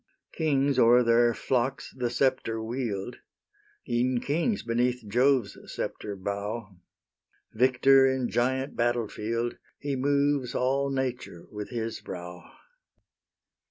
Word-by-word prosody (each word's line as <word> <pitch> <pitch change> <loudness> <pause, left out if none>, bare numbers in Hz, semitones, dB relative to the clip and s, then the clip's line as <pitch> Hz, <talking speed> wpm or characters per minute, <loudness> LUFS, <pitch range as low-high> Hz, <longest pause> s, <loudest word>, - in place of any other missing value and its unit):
Kings 140 -4 +1
o'er 120 +2 +6
their 120 0 +4
flocks 130 +3 -1
the 125 -2 -1
sceptre 125 -3 0
wield; 110 -4 -4 0.7
E'en 120 +1 +1
kings 170 - -1
beneath 120 0 0
Jove's 125 +1 +2 0.2
sceptre 105 -1 -4
bow: 100 +2 -4 0.8
Victor 130 +3 +5
in 130 -2 0
giant 130 +3 0
battle 120 -1 +1
field, 115 +3 -3 0.2
He 140 -1 -3
moves 140 -1 +1
all 135 +2 +1
nature 125 -9 -3
with 105 -1 -6
his 115 -2 -4
brow. 90 -1 -8
125 Hz, 110 wpm, -27 LUFS, 115-135 Hz, 0.8 s, o'er